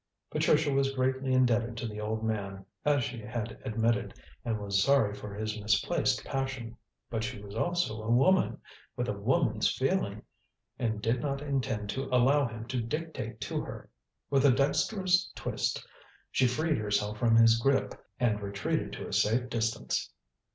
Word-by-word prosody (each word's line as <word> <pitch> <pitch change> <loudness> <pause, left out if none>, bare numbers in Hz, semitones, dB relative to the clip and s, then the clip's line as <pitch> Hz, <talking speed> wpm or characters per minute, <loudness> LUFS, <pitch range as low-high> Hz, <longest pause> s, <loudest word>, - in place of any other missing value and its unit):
Patricia 150 -1 +3
was 135 0 +1
greatly 130 0 0
indebted 120 -2 +2
to 115 - -3
the 105 -1 -6
old 110 +1 -2
man, 100 -3 -3 0.2
as 145 -3 +3
she 125 0 -4
had 110 0 -5
admitted, 115 0 0 0.2
and 115 -2 -1
was 100 -1 +1
sorry 135 -6 +3
for 105 0 -7
his 110 +1 -4
misplaced 105 0 +1
passion. 135 -4 -3 0.4
But 110 -1 -1
she 125 -1 -4
was 100 0 -10
also 115 -3 0
a 110 - -5
woman, 135 +11 +4 0.4
with - - -2
a - - +1
woman's - - +1
feeling, - - -1 0.6
and 110 -3 -1
did 115 +2 +1
not 140 -1 -2
intend 130 -7 -1
to 135 +5 -3
allow 130 +3 +3
him 115 -1 -7
to 130 -2 -1
dictate 130 -2 -4
to - - -2
her. - - -9 0.4
With 135 -1 +4
a 140 - +7
dexterous 180 - +2
twist, - - -2 0.5
she 130 - +3
freed 155 +4 0
herself 105 0 -1
from 115 -2 +4
his 115 0 +6
grip 135 +3 +2 0.3
and 110 -4 +1
retreated 100 0 -2
to - - -6
a - - -7
safe 120 +4 +2
distance. 115 0 -1
120 Hz, 165 wpm, -30 LUFS, 110-135 Hz, 0.6 s, a